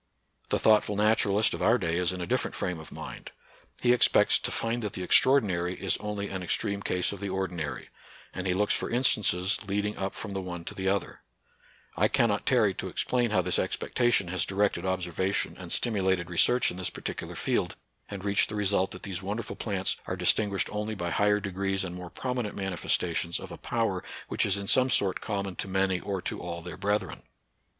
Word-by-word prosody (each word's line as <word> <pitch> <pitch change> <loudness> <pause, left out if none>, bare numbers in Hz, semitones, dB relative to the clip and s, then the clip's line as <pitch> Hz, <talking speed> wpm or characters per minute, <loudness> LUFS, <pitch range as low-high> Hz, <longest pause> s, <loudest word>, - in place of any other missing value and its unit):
The - - +2
thoughtful 105 -1 +4
naturalist 105 0 +3
of - - -4
our 115 +3 +4
day 85 -6 -1
is 90 -1 +2
in 90 -1 -5
a - - -2
different - - -1
frame 90 -2 -2
of 80 - -11
mind. - - -8 0.5
He 120 0 +5
ex 125 - +5
pects - - +4
to - - -1
find 115 +1 -1
that 105 -3 -4
the 95 - -4
extraordinary 95 -6 +3
is 95 - 0
only 105 -1 -4
an 95 -2 -4
extreme 100 +3 0
case 90 -2 0
of 100 - -7
the 100 0 -3
ordinary; 90 -8 -3 0.4
and 95 +1 -4
he 90 - +1
looks 105 +2 +2
for - - -1
instances 105 -6 +2
leading 105 +1 -1
up 95 0 -2
from 100 -2 -5
the 95 - -2
one 90 -2 -6
to - - -5
the 95 0 -3
other, 100 0 -1 0.8
I - - +3
cannot 105 -4 +1
tarry 115 -7 +4
to - - -5
explain 120 -2 0
how 95 -4 +2
this - - +1
expectation 120 -7 +1
has 90 -1 0
directed 95 -2 0
observation 95 +1 -1
and 90 -2 -8
stimulated 95 -6 +1
research 120 +8 +4
in 90 - -8
this 95 - -2
particular - - -6
field, - - 0 0.3
and 100 -1 -6
reached 100 0 +3
the 105 - -5
result 100 -2 +1
that - - -10
these 95 -2 -4
wonderful 105 +4 -4
plants 95 -4 -1
are - - -2
distinguished 100 -3 +1
only 105 +1 -3
by 90 -3 -3
higher 105 +3 +3
degrees 95 0 -2
and 90 -2 -5
more 90 -1 -7
prominent 125 -2 -3
manifestations 85 -3 -1
of 95 -2 -9
a 85 - -7
power 115 -6 -1 0.3
which - - +1
is 100 0 +2
in 100 0 -5
some 130 +4 +4
sort 100 -5 +2
common 100 -3 -3
to - - -2
many 95 -1 +1
or 95 -1 -4
to - - -3
all 85 -1 -5
their 90 - -6
brethren. 105 +1 -1
95 Hz, 205 wpm, -28 LUFS, 90-105 Hz, 0.8 s, He